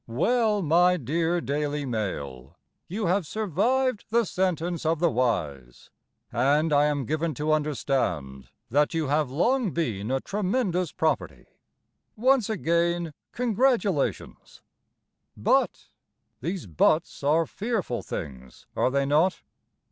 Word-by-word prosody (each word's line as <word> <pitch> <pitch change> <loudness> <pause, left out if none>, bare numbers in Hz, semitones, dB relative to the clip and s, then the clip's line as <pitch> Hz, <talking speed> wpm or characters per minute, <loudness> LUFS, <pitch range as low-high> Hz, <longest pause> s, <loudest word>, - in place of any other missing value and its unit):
Well, 210 - +1
My 175 +3 +4
dear 165 +5 0
Daily 145 0 -2
Mail, 70 - -5 0.3
You 205 +4 -3
have 180 -1 +1
survived 220 - 0
the 230 +1 +2
sentence 175 -3 -1
of 165 +1 +1
the 170 +1 +2
wise, 75 - -2 0.4
And 145 +6 +2
I 145 0 +5
am 145 -3 0
given 155 +3 -1
to 150 +3 -1
understand 125 - -1 0.2
That 145 +5 +2
you 160 -4 -1
have 150 -1 +1
long 230 - +1
been 115 - -2
a 135 +1 +1
tremendous 190 - -1
property. 160 -1 -1 0.7
Once 250 0 +3
again 170 -4 0 0.2
Congratulations! 230 - -1 0.7
BUT - - +1 0.5
(These 175 +5 -3
buts 140 - +1
are 155 +4 +3
fearful 200 - -3
things, 65 -5 -8
Are - - +2
they 140 +1 +1
not?) 155 +7 +2
160 Hz, 115 wpm, -26 LUFS, 135-190 Hz, 0.7 s, I